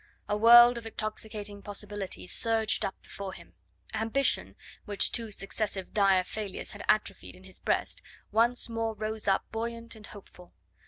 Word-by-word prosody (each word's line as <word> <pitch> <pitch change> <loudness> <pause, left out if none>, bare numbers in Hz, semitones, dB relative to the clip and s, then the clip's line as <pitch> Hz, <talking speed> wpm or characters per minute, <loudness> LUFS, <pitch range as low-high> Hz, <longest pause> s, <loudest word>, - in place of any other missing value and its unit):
A 205 - 0
world 240 +2 +8
of 225 - -9
intoxicating 215 -2 -4
possibilities 200 -2 -5
surged 225 -1 +2
up - - -3
before 195 -1 -7
him. 85 - -14 0.4
Ambition, 225 +5 0 0.3
which 205 -2 +2
two 230 -2 0
successive 195 -1 -2
dire 195 -3 +4
failures 205 0 -5
had - - -9
atrophied - - +1
in - - -17
his - - -5
breast, - - -1 0.3
once 235 +3 +3
more 225 -1 -2
rose 215 0 -3
up 195 - +2
buoyant 230 +1 -4
and 215 -1 -12
hopeful. 185 -3 -14
215 Hz, 150 wpm, -29 LUFS, 200-225 Hz, 0.4 s, world